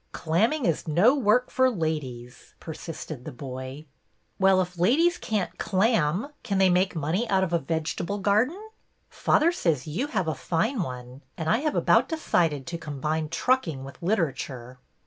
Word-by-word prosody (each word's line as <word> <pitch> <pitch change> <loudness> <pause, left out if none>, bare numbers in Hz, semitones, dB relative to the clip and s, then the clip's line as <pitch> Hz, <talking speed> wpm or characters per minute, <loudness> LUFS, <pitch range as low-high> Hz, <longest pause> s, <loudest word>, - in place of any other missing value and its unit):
'' - - -44
Clamming 220 - +1
is 165 -1 0
no 180 - +5
work 250 -2 +2
for 260 0 +3
ladies," 150 - -5
persisted 160 -4 -7
the 155 - -7
boy. 130 +3 -7 0.6
'^Well, 190 0 +5
if 180 -1 -3
ladies 320 - +3
can't 210 -4 -2
clam, 195 - +1
can 200 -5 -2
they 190 -1 +4
make 180 +1 +2
money 165 +10 -1
out 190 -1 +3
of 175 -2 -2
a 170 - +3
vegetable 165 +5 -3
garden? 215 - +1 0.5
Father 330 +3 +3
says 165 - 0
you 180 - -2
have 190 - -1
a 160 - +1
fine 190 - -1
one, 125 -3 -7 0.2
and 160 - -4
I 195 +8 +3
have 305 +1 -1
about - - +3
decided 165 - 0
to 170 +2 -5
combine 155 +1 -3
trucking 165 - 0
with 135 +4 -11
Literature." 135 - -2
170 Hz, 165 wpm, -26 LUFS, 150-220 Hz, 0.6 s, no